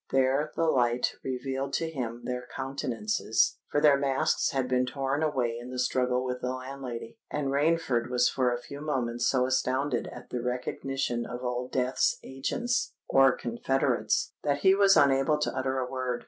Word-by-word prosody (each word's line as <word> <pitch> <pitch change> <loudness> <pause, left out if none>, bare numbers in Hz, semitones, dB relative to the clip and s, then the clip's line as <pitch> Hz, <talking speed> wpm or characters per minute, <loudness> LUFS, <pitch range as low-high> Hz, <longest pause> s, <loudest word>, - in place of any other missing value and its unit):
There 135 +3 +2
the - - 0
light 125 -5 +2
revealed 135 +1 -3
to 165 - 0
him 120 -6 -5
their 125 0 -4
countenances—for 135 - -1
their 145 -2 +5
masks 135 -1 +1
had 135 -2 -1
been 125 0 +1
torn 135 +2 -1
away 125 -7 0
in 120 - -9
the 130 - -6
struggle 125 0 +1
with 125 0 -3
the 125 - -1
landlady; 130 -3 -7
and 145 -2 -2
Rainford 140 -4 +1
was 125 -1 +3
for 125 -2 +1
a 120 - 0
few 140 +3 -9
moments 120 -5 -1
so 125 -2 +2
astounded 130 +1 0
at - - -11
the 125 - -2
recognition 125 0 -2
of 125 +1 -6
Old 125 0 -3
Death's 130 0 +1
agents 230 - -2
or 135 0 +6
confederates, 120 +3 0
that 145 -1 0
he 190 +3 +6
was 195 0 +5
unable 140 +2 +4
to 150 - -2
utter 130 0 -1
a 130 -1 -1
word. 130 -2 -2
130 Hz, 170 wpm, -28 LUFS, 125-140 Hz, -, or